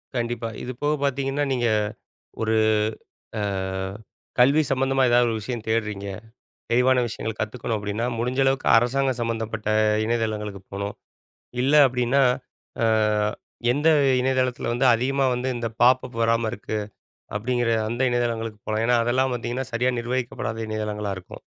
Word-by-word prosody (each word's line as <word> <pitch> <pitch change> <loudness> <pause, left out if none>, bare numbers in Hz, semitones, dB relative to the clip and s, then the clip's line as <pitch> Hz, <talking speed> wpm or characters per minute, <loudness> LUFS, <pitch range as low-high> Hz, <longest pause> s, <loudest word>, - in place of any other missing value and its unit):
கண்டிப்பா. 120 -1 -2
இது 125 - -4
போக 150 +1 +2
பார்த்தீங்கன்னா 140 +1 0
நீங்க, 120 -2 +1 0.8
ஒரு 110 0 +1 0.8
அ - - -1 1.0
கல்வி 140 +5 +5
சம்பந்தமா 135 0 +2
எதாவது 120 0 +5
ஒரு - - -1
விஷயம் 115 0 -5
தேடுறீங்க. 105 -3 -1 0.6
தெளிவான 125 +2 +4
விஷயங்கள் 110 -1 -5
கத்துக்கணும் 115 +1 -2
அப்பிடின்னா, 105 +3 -2
முடிஞ்ச 125 +3 -1
அளவுக்கு 135 0 +1
அரசாங்கம் 130 +2 +1
சம்மந்தப்பட்ட 110 -2 -3 0.4
இணையதளங்களுக்கு 110 -3 -2
போணும். 100 +1 -4 0.7
இல்ல 135 +3 +2
அப்பிடின்னா, 125 +2 +2 0.6
அ - - +4 0.9
எந்த 150 +4 +3 0.3
இணையதளத்தில 130 -2 0
வந்து 125 +3 +1
அதிகமா 135 +3 0
வந்து 125 +2 -2
இந்த 120 -1 -2 0.2
பாப்பப் 125 -1 +3
வராம 115 0 +2
இருக்கு, 110 +1 -4 0.6
அப்பிடிங்கிற 120 +2 0 0.2
அந்த 120 +2 -4
இணையதளங்களுக்கு 115 -3 -2
போலாம். 110 +1 0
ஏன்னா, 120 0 +4
அதெல்லாம் 130 +2 +1
பார்த்தீங்கன்னா 120 +2 -3
சரியா 125 +2 +1
நிர்வகிக்கப்படாத 120 -2 -3
இணையதளங்களா 105 -1 -3
இருக்கும். 90 - -12
120 Hz, 130 wpm, -24 LUFS, 110-130 Hz, 1.0 s, கல்வி